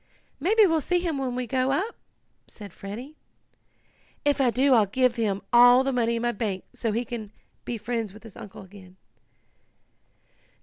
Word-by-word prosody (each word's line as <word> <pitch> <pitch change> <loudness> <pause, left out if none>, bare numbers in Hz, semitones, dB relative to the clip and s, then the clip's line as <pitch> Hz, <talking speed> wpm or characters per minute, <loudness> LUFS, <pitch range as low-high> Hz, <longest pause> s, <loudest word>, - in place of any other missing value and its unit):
"Maybe 420 +8 +4
we'll 325 -4 +2
see 360 +5 +1
him 335 -5 -2
when 255 -2 -2
we 250 0 -2
go 255 +2 0
up," 390 +11 -1 0.5
said 205 -4 -12
Freddie. 240 +10 -8 1.1
"If 285 -1 +2
I 255 - +4
do 260 +3 +3
I'll 220 -4 +4
give 255 +4 +1
him 205 -4 -1
all 245 +2 +7
the 270 0 -1
money 235 -1 +1
in 230 - -3
my 240 - +1
bank 200 -4 -3
so 225 - -2
he 235 +3 -1
can 220 -3 -6 0.3
be 240 - -3
friends 225 -1 -3
with 215 +3 -15
his 225 -3 -13
uncle 195 - -10
again." 190 -1 -15
240 Hz, 175 wpm, -26 LUFS, 215-270 Hz, 1.1 s, all